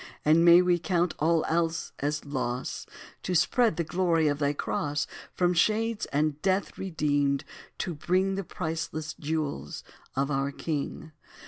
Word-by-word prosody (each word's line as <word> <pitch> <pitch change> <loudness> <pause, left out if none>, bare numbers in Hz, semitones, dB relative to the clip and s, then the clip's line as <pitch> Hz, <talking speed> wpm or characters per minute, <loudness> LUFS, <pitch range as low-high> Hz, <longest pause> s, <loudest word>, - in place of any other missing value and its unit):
And 160 +2 +5
may 175 +1 +8
we 175 -1 +3
count 175 +1 +1
all 160 +1 +2
else 165 0 0
as 145 +1 -2
loss 130 -3 -3 0.3
To 180 - -2
spread 175 +5 +3
the 170 - +1
glory 165 -2 +1
of 145 0 -1
thy 145 -1 +2
cross 145 0 -2 0.3
From 180 -1 +2
shades 215 +5 +1
and 150 +1 0
death 190 0 0
redeemed, 145 -6 0 0.3
to 175 - -2
bring 185 +5 +1
The 195 +1 -2
priceless 160 -2 -4
jewels 145 - -3 0.3
of 135 +2 0
our 135 0 0
King. 155 +1 -4
160 Hz, 145 wpm, -28 LUFS, 145-175 Hz, 0.3 s, may